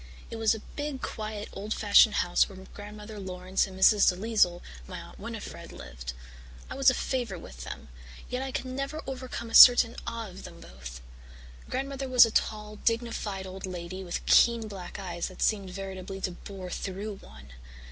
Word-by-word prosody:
It 230 - -5
was 225 0 +3
a 220 - -8
big, 290 -2 -4
quiet, 215 -1 -4
old 210 +2 -4
fashioned 210 +1 +6
house 175 - +3
where 195 - -11 0.2
Grandmother 210 +1 -9
Laurance 185 0 -1
and 190 0 -10
Mrs. 205 +1 +6
DeLisle, 185 -2 +1 0.2
my - - -7
Aunt - - -12
Winnifred, - - -7
lived. - - -8 0.6
I - - -2
was 270 0 +5
a 255 - +1
favourite 235 -10 -2
with - - -10
them, - - -8 0.4
yet 250 +1 -3
I 265 0 -4
could 255 - -3
never 275 +4 -4
overcome 255 -3 -6
a - - -10
certain 245 -1 +9
awe 230 -1 -4
of 185 0 -11
them - - -10
both. 60 0 -10 0.7
Grandmother 270 +1 -3
was 250 -2 +8
a 225 - -3
tall, 210 -1 -1
dignified 225 -4 -1
old 190 0 -7
lady 185 +1 -6
with 175 -2 -4
keen 235 -2 +5
black 190 -4 -8
eyes 175 -3 -4
that 185 - -5
seemed 200 -3 +1
veritably 190 0 -6
to 185 - -1
bore 185 0 -9
through 200 +3 -4
one. 70 - -14
205 Hz, 175 wpm, -28 LUFS, 185-230 Hz, 0.7 s, certain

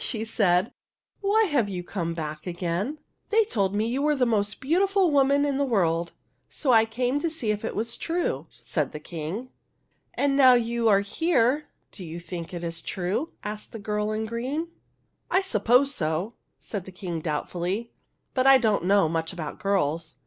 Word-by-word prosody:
she 220 -2 -1
said, 190 -2 +2 0.2
" - - -50
why 415 +2 +3
have 285 - +1
you 180 -2 -4
come 170 -3 -3
back 155 0 -5
again? 180 - -2
" - - -47
" - - -47
They 445 0 +4
told 200 - 0
me 215 +2 +1
you 250 +4 -1
were 300 0 +2
the 260 -2 +2
most 210 -3 0
beautiful 370 +5 +2
woman 280 0 +4
in 280 -2 0
the 280 - +2
world, 170 -9 +1 0.4
so 275 - 0
I 225 -2 +6
came 245 +5 -1
to 335 - -1
see 255 -9 -1
if 210 0 -3
it 225 - -3
was 230 +2 -1
true," 330 - -2
said 150 -4 -3
the 150 - -5
King. 170 +10 -5 0.3
" - - -45
And 280 -1 +2
now 260 -2 +7
you 235 -1 +1
are 200 -1 +5
here, 290 - +1 0.2
do 190 - -9
you 165 0 -6
think 170 -1 -7
it 175 -1 -6
is 165 -1 -3
true? 195 - -2
" - - -43
asked 210 0 -6
the - - -5
girl 210 0 -2
in 215 +1 -2
green. 260 +9 -3 0.3
" - - -46
I 375 - +3
suppose 250 - +3
so," 165 +3 -1 0.2
said 200 -5 -6
the 190 - -9
King, 180 -2 -5
doubtfully; 175 +8 -3 0.2
" - - -49
but 260 0 +2
I 270 0 +9
don't 215 -8 +1
know 195 -2 +4
much 165 0 -2
about 165 -5 -6
girls. 165 -5 0
215 Hz, 205 wpm, -26 LUFS, 175-270 Hz, 0.4 s, I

